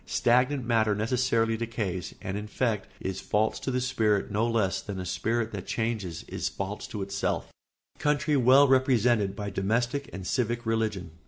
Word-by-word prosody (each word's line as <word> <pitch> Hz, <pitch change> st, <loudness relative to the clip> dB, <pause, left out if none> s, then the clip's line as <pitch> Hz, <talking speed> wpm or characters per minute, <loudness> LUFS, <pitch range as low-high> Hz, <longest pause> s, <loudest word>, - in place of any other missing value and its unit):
Stagnant 125 Hz, +2 st, +2 dB
matter 110 Hz, -3 st, +2 dB
necessarily 115 Hz, 0 st, +1 dB
decays 105 Hz, -6 st, -3 dB
and 95 Hz, -, -3 dB
in 105 Hz, +1 st, -4 dB
effect 105 Hz, -2 st, -1 dB
is 95 Hz, 0 st, -4 dB
false 105 Hz, +1 st, 0 dB
to -, -, -4 dB
the 125 Hz, -1 st, 0 dB
spirit 110 Hz, -6 st, +1 dB
no 110 Hz, +3 st, +1 dB
less 110 Hz, -5 st, +1 dB
than 100 Hz, -2 st, -6 dB
a 90 Hz, -, -4 dB
spirit 115 Hz, +5 st, -1 dB
that 100 Hz, -3 st, -6 dB
changes 110 Hz, -8 st, -2 dB
is -, -, -2 dB
false 100 Hz, +2 st, -5 dB
to 105 Hz, -3 st, -4 dB
itself. 100 Hz, 0 st, -1 dB
[Sidenote: -, -, -25 dB
Country 150 Hz, 0 st, +2 dB
well 135 Hz, +2 st, +6 dB
represented 120 Hz, -6 st, +3 dB
by 100 Hz, -1 st, -4 dB
domestic 120 Hz, +8 st, -1 dB
and 95 Hz, -1 st, -7 dB
civic 120 Hz, +2 st, -1 dB
religion. 110 Hz, -6 st, -1 dB
110 Hz, 170 wpm, -28 LUFS, 100-125 Hz, -, well